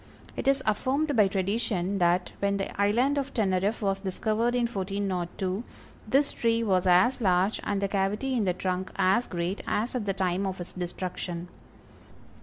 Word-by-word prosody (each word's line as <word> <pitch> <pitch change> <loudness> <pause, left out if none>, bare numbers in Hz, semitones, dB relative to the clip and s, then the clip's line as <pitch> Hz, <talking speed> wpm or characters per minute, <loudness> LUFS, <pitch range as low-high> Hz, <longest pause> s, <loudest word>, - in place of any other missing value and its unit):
It - - -4
is 275 0 +3
affirmed 275 +7 +1
by 210 -3 +5
tradition 195 -1 -1
that, 175 +1 +2
when 200 0 +1
the 195 0 -3
island 245 +8 +3
of 275 0 -5
Teneriffe 200 0 +1
was 195 -1 +1
discovered 215 +5 0
in 245 -1 +2
1402, 190 -2 -2 0.4
this 275 +6 +3
tree 230 0 +1
was 190 -3 +2
as 185 +9 +4
large, 190 +1 +2
and 200 -1 -1
the 200 - +1
cavity 205 +7 -1
in 230 -5 +1
the 180 - +2
trunk 185 +1 -2
as 195 +6 +2
great, 175 +3 -3
as 225 +4 0
at 235 -5 -3
the 195 - +1
time 190 0 0
of 190 -1 -4
its 175 - -7
destruction. 175 -1 -5
195 Hz, 170 wpm, -28 LUFS, 185-230 Hz, 0.4 s, by